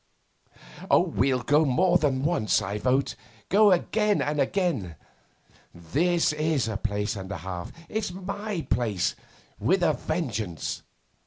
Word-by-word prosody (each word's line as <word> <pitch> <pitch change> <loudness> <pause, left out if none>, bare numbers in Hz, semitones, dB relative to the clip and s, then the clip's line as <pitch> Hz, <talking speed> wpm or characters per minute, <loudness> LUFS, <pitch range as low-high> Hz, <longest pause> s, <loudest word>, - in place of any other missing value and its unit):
'We'll 130 -2 +2
go 150 +4 +4
more 175 +6 +3
than 135 -3 0
once, 155 -9 +2
I 100 +2 -3
vote; 130 +3 +1 0.3
go 205 +1 +6
again 210 +3 +2
and 150 0 0
again. 140 - -1 0.8
This 155 - +1
is 155 -4 0
a 110 - -3
place 105 0 -2
and 95 -1 -7
a 100 - -3
half. 90 -2 -6 0.2
It's 215 -4 -2
my 195 0 -4
place 110 -7 0 0.4
with 185 0 +2
a 160 -3 +4
vengeance 115 - -3
145 Hz, 130 wpm, -26 LUFS, 110-180 Hz, 0.8 s, go